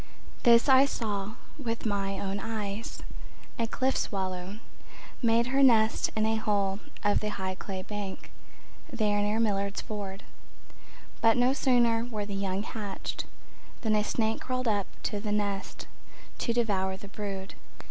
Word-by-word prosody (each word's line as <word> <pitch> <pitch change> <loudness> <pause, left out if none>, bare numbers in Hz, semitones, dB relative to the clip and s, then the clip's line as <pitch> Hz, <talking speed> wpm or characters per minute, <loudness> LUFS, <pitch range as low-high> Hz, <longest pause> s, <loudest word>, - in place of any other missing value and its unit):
This 235 0 +6
I 265 0 +8
saw 210 -5 -2 0.2
with 230 -4 -3
my 195 -2 0
own 200 0 -2
eyes: 210 0 -4 0.6
A 230 - +1
cliff—swallow 195 -7 -1 0.6
Made 230 -1 +4
her 270 +3 +2
nest 225 -4 +5
in 215 0 +2
a 220 0 +2
hole 200 -2 +1 0.2
of 205 0 +3
the 215 - -2
high 190 -2 -3
clay 185 0 -5
bank 205 -1 -6 0.6
There 210 -4 +1
near 210 +2 +1
Miller's 200 -2 +1
Ford. 200 -2 -6 1.0
But 225 +1 +5
no 250 +2 +4
sooner 240 -4 +3
were 215 -4 -3
the 205 - -5
young 195 0 -1
hatched 210 -3 -4 0.6
Than 220 -3 +1
a 210 - +3
snake 220 +1 0
crawled 255 -1 -2
up 205 -3 +1 0.2
to 205 - -1
the 210 0 -3
nest 200 -1 -2 0.5
To 235 - 0
devour 195 -5 +1
the 200 +1 -10
brood. 195 -2 -5
210 Hz, 145 wpm, -29 LUFS, 200-230 Hz, 1.0 s, I